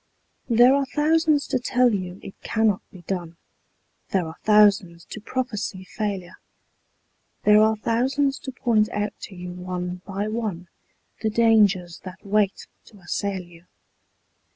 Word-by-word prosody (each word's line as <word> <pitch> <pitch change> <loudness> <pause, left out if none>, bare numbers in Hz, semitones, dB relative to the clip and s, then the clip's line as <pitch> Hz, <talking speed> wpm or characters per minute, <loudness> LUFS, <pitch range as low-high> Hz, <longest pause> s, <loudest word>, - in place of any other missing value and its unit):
There 240 +3 +6
are 275 -1 +1
thousands 310 -1 +3
to 260 - +1
tell 250 -1 +2
you 185 -1 -4
it 195 - -9
cannot 220 -3 +1
be 180 -2 -14
done, 170 -2 -4 0.7
There 190 -3 +1
are 160 0 -8
thousands 205 -5 +4
to 215 - -7
prophesy 215 -6 -3
failure; 195 -3 -4 1.1
There 210 0 +6
are 220 0 +4
thousands 265 +6 0
to 265 - -7
point 225 -4 +1
out 205 0 -2
to 195 - -13
you 180 0 -7
one 180 0 -5
by 200 +1 -3
one, 215 -6 -4 0.5
The 220 - +1
dangers 210 -6 +3
that 185 +1 -10
wait 200 -1 +1 0.2
to 210 - -17
assail 190 +1 -3
you. 175 0 -18
210 Hz, 140 wpm, -24 LUFS, 180-230 Hz, 1.1 s, There